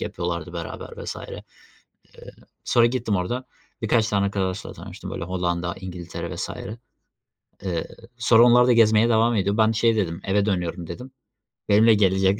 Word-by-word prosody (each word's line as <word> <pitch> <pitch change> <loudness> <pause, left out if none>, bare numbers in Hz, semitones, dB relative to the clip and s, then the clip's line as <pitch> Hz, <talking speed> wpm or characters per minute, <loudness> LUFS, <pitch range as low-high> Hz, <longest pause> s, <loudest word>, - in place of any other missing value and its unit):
yapıyorlardı 85 -1 -4
beraber 85 -1 -7
vs. - - -5
Eee, - - -8 1.2
sonra 120 -1 +4
gittim 120 -4 0
orada 120 +8 -2 0.4
birkaç 110 0 +2
tane 100 -1 +1
arkadaşla 100 -1 -3
tanıştım, - - -9
böyle, - - -5
Hollanda, 85 -1 -2
İngiltere 90 -2 -6
vs. - - -4 1.1
Eee, 85 -4 -2 0.3
sonra 115 0 +5
onlar 120 0 +6
da 125 - +5
gezmeye 110 0 +5
devam 115 +1 +3
ediyor. 100 0 0
Ben 110 0 +4
şey 115 0 +2
dedim: 85 -5 -1
"Eve 100 +1 +1
dönüyorum." 90 -3 -2
dedim. 125 +11 -8 0.6
Benimle 110 +2 +6
gelecek 95 0 +2
100 Hz, 145 wpm, -23 LUFS, 90-115 Hz, 1.2 s, onlar